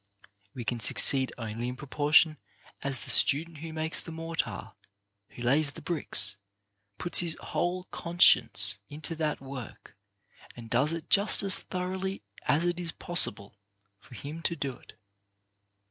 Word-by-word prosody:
We 120 -3 -7
can 120 0 -3
succeed 130 +5 +6
only 115 0 -6
in 125 - -5
proportion 150 +2 +1 0.4
as 140 -2 -3
the 130 - -1
student 155 +6 +4
who 160 +1 -8
makes 160 0 -3
the 165 - -11
mortar, 165 0 -5 0.6
who 120 - -11
lays 140 +4 +1
the 165 - -12
bricks, 155 - +2 0.6
puts 175 - +1
his 170 -2 0
whole 180 +1 -3
conscience 105 - +3
into 155 +3 -7
that 155 -2 -3
work, 135 -4 -11 0.6
and 115 -1 -12
does 130 +6 +1
it 165 -1 -7
just 200 +1 +6
as 195 -1 +4
thoroughly 190 +1 -5 0.2
as 160 +4 +1
it 175 0 -2
is 170 -2 -4
possible^ 100 - -2 0.5
for 125 - -16
him 150 +7 -9
to 170 - -1
do 140 -4 -4
it. - - -19
155 Hz, 145 wpm, -27 LUFS, 130-170 Hz, 0.6 s, succeed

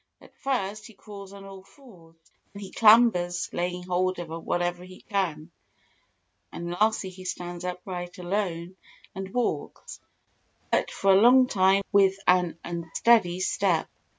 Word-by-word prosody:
At - - -19
first 215 -6 -3
he 225 - -16
crawls 200 -1 -11
on 200 0 -12
all 195 -1 -11
fours, 190 - -19 0.4
then 200 0 -9
he 190 - -9
clambers, 210 -6 +4
laying 180 +1 -3
hold 185 +1 -1
of 175 -2 -7
whatever 175 0 -2
he 185 0 -13
can; 175 -6 -3 1.0
and 170 0 -6
lastly 205 0 0
he 185 0 -12
stands 175 -1 -6
upright 180 0 -6
alone 180 -1 -3 0.4
and 190 0 -7
walks, 245 +1 -3 0.7
but - - +1
for 195 - +1
a 190 - +5
long 255 +3 +7
time 195 -3 +2
with 195 -2 +4
an 180 -2 +2
unsteady 175 +3 +1
step. 185 -3 0
185 Hz, 140 wpm, -26 LUFS, 175-200 Hz, 1.0 s, long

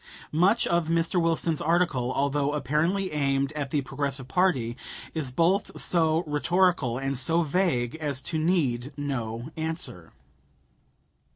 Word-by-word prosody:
Much 185 +9 +3
of 170 -2 +1
Mr. 165 +2 +1
Wilson's 165 -1 +1
article, 160 -7 +1
although 140 +1 0
apparently 155 +7 0
aimed 140 -2 0
at 145 -2 -3
the 145 +1 0
Progressive 135 -1 -3
party, 130 -8 +1 0.4
is 155 -5 -2
both 170 +10 +1
so 165 -1 +2
rhetorical 155 -3 +1
and 135 -1 -2
so 165 +6 +2
vague 150 -7 0
as 145 -4 -2
to 160 +4 -3
need 145 -7 0
no 125 -2 -4
answer. 160 - -5
150 Hz, 125 wpm, -26 LUFS, 135-170 Hz, 0.4 s, Much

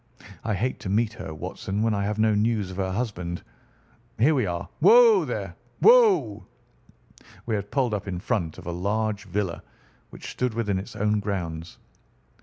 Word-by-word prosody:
I 110 -2 -1
hate 125 +7 -2
to 95 - -6
meet 110 +2 +1
her, - - -7
Watson, 95 +6 -4
when 115 -1 +2
I 100 -1 -1
have 105 +1 -2
no 110 0 +3
news 105 -2 0
of 90 - -9
her 95 -1 -1
husband. 95 -6 -3 0.7
Here 135 +8 +4
we 125 -8 +1
are. 85 -1 -4
Whoa, 460 -1 +7
there, - - -4 0.3
whoa!" 445 - +5 1.0
We 115 - -2
had 100 -1 -2
pulled 130 -3 0
up 105 -1 -3
in 90 -2 -3
front 90 -6 -2
of - - -11
a 85 - -3
large 105 +4 -2
villa 95 -2 -3 0.5
which - - -9
stood 125 -3 -2
within 105 -5 0
its 95 - -9
own 105 +1 +1
grounds. 85 -5 -4
105 Hz, 175 wpm, -25 LUFS, 95-115 Hz, 1.0 s, Whoa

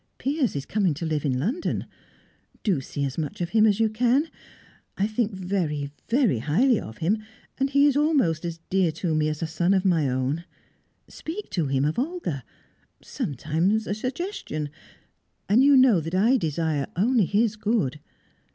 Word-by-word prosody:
Piers 275 - 0
is 140 - -3
coming 195 -7 +1
to 165 - -4
live 155 -2 -1
in 130 -3 +1
London. 240 - -2 0.8
Do 185 -10 +1
see 140 +2 -3
as 135 +3 -4
much 150 -3 -4
of 175 -1 -2
him 220 +1 +4
as 205 0 +2
you 225 - +4
can. 245 +8 +1 0.7
I 195 - +2
think 220 +1 -1
very, 180 -7 -2 0.2
very 230 - +2
highly 205 - +2
of 110 0 -9
him, 200 +7 +1 0.4
and 270 +1 +1
he 280 +1 +4
is 285 -2 +3
almost 280 - +2
as 170 -1 -4
dear 185 -3 +3
to 165 +1 -2
me 155 0 +1
as 155 +1 -4
a - - +1
son 175 +4 +1
of 190 0 +1
my 165 -7 +3
own. 130 +6 -1 0.6
Speak 370 +7 -7
to 165 -6 0
him 135 +1 +1
of 155 +9 0
Olga. 260 - -3 0.6
Sometimes 160 - -1
a 205 - -2
suggestion 250 - -4 0.8
and 225 +6 +5
you 280 0 +6
know 255 -8 +6
that 165 +3 -4
I 225 +8 +4
desire 160 - -1
only 220 +3 +3
his 215 +3 +1
good." 210 - -1
190 Hz, 175 wpm, -25 LUFS, 155-235 Hz, 0.8 s, you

